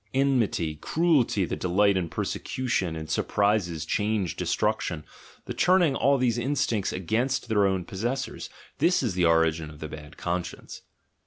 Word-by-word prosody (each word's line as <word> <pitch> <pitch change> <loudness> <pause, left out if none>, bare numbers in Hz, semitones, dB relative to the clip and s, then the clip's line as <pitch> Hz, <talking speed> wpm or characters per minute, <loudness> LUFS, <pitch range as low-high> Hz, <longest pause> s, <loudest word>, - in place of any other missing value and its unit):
En 135 -1 +3
mity, 85 -8 0
cruelty, 150 - +2
the - - -3
delight 100 +3 +2
in 90 -3 -1
persecution, 105 -9 -2
in 80 0 -5
surprises, 90 -3 0
change, 105 +1 -1
destruction 75 - -1 0.2
— - - -23
the - - -4
turning 180 -6 +3
all 140 +1 +3
these 120 -2 +1
instincts 120 -5 0
against 115 +8 -1
their 105 -2 +3
own 95 -2 -1
possessors: 120 +9 -4 0.3
this 180 -4 +3
is 115 -6 0
the 90 -1 +2
origin 80 -1 +2
of 75 - -12
the 80 - -5
"bad 75 -1 -10
con 90 0 -1
science." - - -10
100 Hz, 160 wpm, -26 LUFS, 85-130 Hz, 0.3 s, En